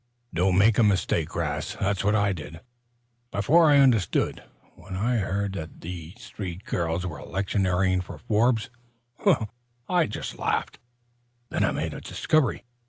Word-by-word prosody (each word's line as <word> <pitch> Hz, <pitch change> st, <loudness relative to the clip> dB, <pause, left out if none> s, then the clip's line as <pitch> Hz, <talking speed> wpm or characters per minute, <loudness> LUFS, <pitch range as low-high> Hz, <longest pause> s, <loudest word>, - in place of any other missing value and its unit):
"Don't 90 Hz, +2 st, +2 dB
make 105 Hz, +3 st, +5 dB
a -, -, +6 dB
mistake, 90 Hz, -5 st, +1 dB
'Rast. 85 Hz, +5 st, -2 dB
That's 100 Hz, 0 st, 0 dB
what 105 Hz, +1 st, +3 dB
I 100 Hz, -2 st, +2 dB
did, 80 Hz, 0 st, -8 dB, 0.7 s
before 155 Hz, +12 st, +4 dB
I 145 Hz, -, +6 dB
understood. 125 Hz, -, +3 dB, 0.3 s
When 95 Hz, -, -9 dB
I 115 Hz, +6 st, +1 dB
heard 100 Hz, -1 st, -1 dB
that 80 Hz, -4 st, -7 dB, 0.4 s
three 100 Hz, -7 st, -6 dB
girls 85 Hz, -2 st, -2 dB
were 85 Hz, -3 st, -5 dB
electioneering 95 Hz, -1 st, 0 dB
for 90 Hz, -, -9 dB
Forbes 115 Hz, 0 st, +1 dB, 1.2 s
I 175 Hz, -4 st, +2 dB
just -, -, -6 dB
laughed. -, -, -1 dB, 0.7 s
Then -, -, 0 dB
I -, -, +3 dB
made -, -, -2 dB
a -, -, -7 dB
discovery. 155 Hz, -8 st, 0 dB
100 Hz, 140 wpm, -26 LUFS, 90-110 Hz, 1.2 s, a